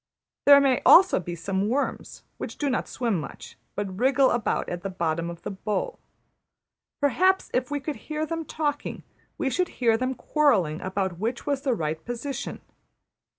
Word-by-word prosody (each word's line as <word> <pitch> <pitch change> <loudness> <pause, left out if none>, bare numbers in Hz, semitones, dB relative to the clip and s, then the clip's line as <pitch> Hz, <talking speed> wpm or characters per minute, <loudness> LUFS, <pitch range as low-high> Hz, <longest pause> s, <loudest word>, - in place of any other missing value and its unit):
There 285 0 +10
may 270 -3 +3
also 375 - +7
be 175 -1 -5
some 190 +4 -1
worms, 275 +4 -2 0.2
who - - -3
do 285 -2 -2
not 255 - -1
swim 230 -8 -1
much, 150 - -9 0.2
but 195 -2 -4
wriggle 265 +1 +4
about 240 -3 0
at 175 0 -4
the 195 - -4
bottom 170 -2 -1
of 170 0 -9
the - - -4
bowl. 210 - -3 1.0
Perhaps 370 +7 +3
if 250 0 0
we 290 0 -1
could 290 +2 -4
hear 310 0 -3
them 330 +1 -3
talking 295 -2 -3 0.3
we 275 -5 -1
should 365 +4 +1
hear 230 -3 +3
them 255 +2 -1
quarrelling 230 - +2
about 190 -2 -2
which 230 +4 -2
was 280 -2 0
the 265 -3 +1
right 155 -3 -3
position. 245 +3 -5
245 Hz, 170 wpm, -26 LUFS, 190-285 Hz, 1.0 s, There